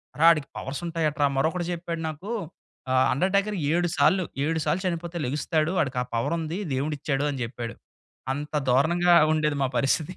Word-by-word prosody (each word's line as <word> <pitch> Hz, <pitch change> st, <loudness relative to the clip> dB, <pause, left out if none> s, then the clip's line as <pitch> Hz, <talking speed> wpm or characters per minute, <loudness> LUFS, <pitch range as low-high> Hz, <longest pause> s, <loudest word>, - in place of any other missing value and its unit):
అరె, 155 Hz, -, 0 dB
వాడికి 155 Hz, -5 st, +5 dB
పవర్స్ 135 Hz, +4 st, -5 dB
ఉంటాయటరా 155 Hz, -3 st, +1 dB
మరొకడు 170 Hz, +4 st, 0 dB
చెప్పాడు 170 Hz, -1 st, -4 dB
నాకు 155 Hz, +7 st, -8 dB, 0.6 s
ఆహ్, 130 Hz, 0 st, +4 dB
"అండర్టేకర్ 200 Hz, +7 st, +1 dB, 0.2 s
7 175 Hz, +1 st, +2 dB
సార్లు 185 Hz, +3 st, +4 dB, 0.2 s
7 160 Hz, +2 st, 0 dB
సార్లు 165 Hz, +5 st, +1 dB
చనిపోతే 170 Hz, 0 st, -3 dB
లేగుస్తాడు! 155 Hz, +4 st, 0 dB
వాడికా 130 Hz, -4 st, 0 dB
పవర్ 115 Hz, +8 st, 0 dB
ఉంది. 160 Hz, +2 st, -3 dB, 0.2 s
దేవుడిచ్చాడు" 140 Hz, 0 st, -1 dB
అని 135 Hz, -, -5 dB
చెప్పాడు. 115 Hz, -1 st, -6 dB, 0.6 s
అంత 145 Hz, +2 st, -6 dB, 0.2 s
దారుణంగా 170 Hz, +7 st, +4 dB, 0.2 s
ఉండేది 150 Hz, -2 st, +1 dB
మా 135 Hz, -, +2 dB
పరిస్థితి. 145 Hz, +7 st, 0 dB
155 Hz, 155 wpm, -26 LUFS, 140-170 Hz, 0.6 s, వాడికి